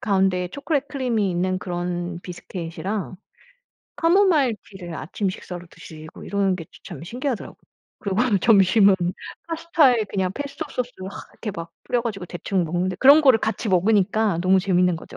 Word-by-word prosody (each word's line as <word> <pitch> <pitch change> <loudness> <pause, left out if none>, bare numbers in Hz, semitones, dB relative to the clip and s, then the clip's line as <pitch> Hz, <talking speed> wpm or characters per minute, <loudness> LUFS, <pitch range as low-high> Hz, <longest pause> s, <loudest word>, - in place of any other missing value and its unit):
가운데에 190 -3 +1
초콜릿 280 - -2
크림이 240 -8 0
있는 185 +1 0
그런 175 -1 -4
비스킷이랑 180 +3 -5 0.8
카모마일 330 - +3
티를 180 -4 -8
아침 195 +4 -3
식사로 175 -1 -8
드시고 155 0 -12
이러는 200 -2 +1
게 165 - -7
저 - - -53 0.2
참 140 - -10
신기하더라고요. 245 +4 -4 0.4
그리고 195 0 -2 0.2
점심은 195 0 +5 0.5
파스타에 315 -8 +3
그냥 190 -2 -1
페스토 285 +2 -5
소스를 245 -7 -5
하 - - -10 0.2
이렇게 215 - -5
막 165 0 -7
뿌려 245 -1 0
가지고 200 -6 -4
대충 180 +1 -2
먹는데 180 +3 -1
그런 280 +7 +7
거를 260 -6 +6
같이 220 0 -2
먹으니까 200 0 +2
너무 190 +1 +4
재밌는 180 -2 +2
거죠. - - -11
195 Hz, 380 characters per minute, -23 LUFS, 180-240 Hz, 0.8 s, 그런